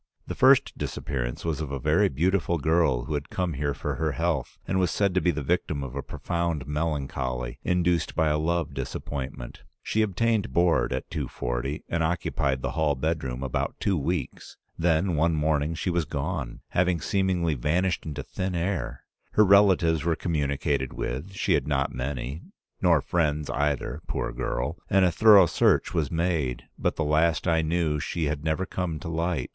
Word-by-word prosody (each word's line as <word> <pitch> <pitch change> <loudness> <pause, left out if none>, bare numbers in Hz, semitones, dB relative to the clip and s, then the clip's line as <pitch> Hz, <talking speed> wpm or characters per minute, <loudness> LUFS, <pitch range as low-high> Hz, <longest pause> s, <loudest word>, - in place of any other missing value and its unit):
The - - -4
first - - +5
disappearance 60 -2 -3
was 80 -2 -1
of 75 -3 -4
a 70 - -2
very 80 +10 +3
beautiful 85 +4 +1
girl 80 -5 +2
who 80 - -4
had 70 -1 -3
come 90 -3 -1
here 70 0 -1
for - - -3
her 80 -2 0
health 85 +2 -1
and 95 - +1
was 90 -2 +2
said 100 0 +1
to 95 - +2
be 90 - +2
the 75 -3 -1
victim 75 -2 -1
of 65 -2 -6
a 70 - -2
profound 85 -2 -2
melancholy, 70 -5 -2
induced 90 -2 +1
by 80 -2 +2
a 75 0 +1
love 80 -2 -1
disappointment. 65 -1 -5 0.2
She 110 - 0
obtained 110 - +1
board 85 +1 +3
at - - -4
240 - - -3
and 85 - -1
occupied 70 -5 -1
the - - -1
hall 75 -3 +1
bedroom 65 -3 -2
about 65 - -2
two 100 - +1
weeks; 80 -2 -3 0.2
then 85 +1 +1
one 80 +2 +2
morning 75 +1 +1
she 90 +3 -1
was 85 -2 0
gone, 75 -3 -4
having 90 -1 +1
seemingly 95 -4 +1
vanished 80 +7 0
into 75 -2 -5
thin 95 +3 -3
air. 85 -9 -2 0.3
Her 105 - +6
relatives 95 -6 +5
were 85 0 +1
communicated 70 -5 -1
with; 70 +11 -4
she 95 - +1
had - - +1
not 70 -2 0
many, 65 +3 -4 0.4
nor - - +4
friends 75 -4 0
either, 70 +1 -1
poor - - -2
girl, 75 +8 -3
and 95 -1 +4
a 90 - +3
thorough 105 +1 +7
search 80 - +2
was 80 -5 0
made, 80 -7 -1
but - - -1
the 80 - -1
last 80 +3 +2
I 80 -1 +3
knew 80 -1 0
she 85 +3 -3
had 75 0 -2
never 80 +4 0
come 90 -4 -3
to - - -6
light. 80 -4 -1
80 Hz, 180 wpm, -26 LUFS, 70-85 Hz, 0.4 s, thorough